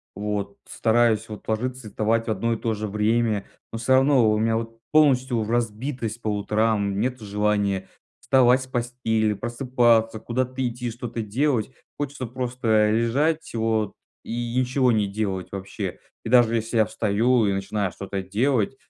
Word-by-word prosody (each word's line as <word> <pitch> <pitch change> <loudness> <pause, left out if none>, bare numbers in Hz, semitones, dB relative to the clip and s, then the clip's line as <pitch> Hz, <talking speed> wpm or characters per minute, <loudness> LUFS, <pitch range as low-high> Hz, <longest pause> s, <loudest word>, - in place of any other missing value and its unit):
вот 105 -1 -3
стараюсь, 115 -1 +2
вот, 105 - -9
ложиться 125 +2 -2
и - - -8
вставать 115 +2 0
в - - 0
одно 115 +3 0
и - - -2
то 115 0 -1
же 105 0 -4
время, 105 0 +1 0.3
но 115 - -4
всё 115 +3 +1
равно 130 -3 +5
во - - +3
у 105 - 0
меня 110 0 +2
вот 115 0 -6
полностью 130 -6 +3
разбитость 120 0 -2
по - - -3
утрам, 105 -1 0
нет 125 +3 -1
желания 100 -2 0 0.3
вставать 130 0 +4
с - - -11
постели, 120 -3 0
просыпаться, 120 0 +1
куда-то 130 +2 -2
идти, 120 0 -4
что-то 120 0 -5
делать. 120 +2 0 0.3
Хочется 145 -3 -3
просто 120 -3 +1
лежать 135 +9 +1
вот 110 -2 0 0.3
и 120 0 -3
ничего 130 0 +2
не 105 -2 +2
делать 100 -3 -3
вообще. 100 -1 -5 0.3
И - - -3
даже 120 -1 +5
если 115 +1 -1
я 110 - +5
встаю 110 +4 +2
и 100 - +1
начинаю 100 -1 -2
что-то 100 +1 -5
делать, 110 +4 0
115 Hz, 160 wpm, -24 LUFS, 105-125 Hz, 0.3 s, равно